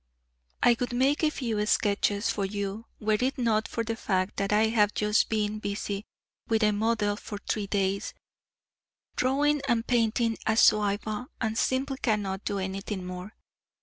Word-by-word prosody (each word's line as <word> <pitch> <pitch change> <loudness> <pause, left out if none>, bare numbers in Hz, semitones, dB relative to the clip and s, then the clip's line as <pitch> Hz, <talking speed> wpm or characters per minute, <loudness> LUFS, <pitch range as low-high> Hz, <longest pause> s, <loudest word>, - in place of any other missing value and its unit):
I 240 - +6
would 245 0 -2
make 265 +4 +2
a 310 - +5
few 230 -8 -2
sketches 205 0 +1
for 200 - -2
you 200 +2 -4
were 215 0 +1
it 260 +3 0
not 225 -3 +1
for 230 - -2
the 225 0 -3
fact 190 -4 -1
that 200 0 -1
I 215 +1 +4
have 210 -2 +2
just 210 +1 +2
been 215 -1 -1
busy 200 0 -3 0.4
with 225 -1 +2
a 210 - +4
model 210 -1 +1
for 205 0 -7
three 205 0 -3
days 195 -1 -1 1.0
drawing 285 +3 +2
and 235 -2 +1
painting 230 -1 +1
a 220 0 +2
Zouave 210 +2 +3
and 220 -2 -1
simply 265 +3 0
cannot 205 -4 -1
do 200 - -1
anything 190 0 -4
more. 180 +3 -7
215 Hz, 160 wpm, -28 LUFS, 200-230 Hz, 1.0 s, I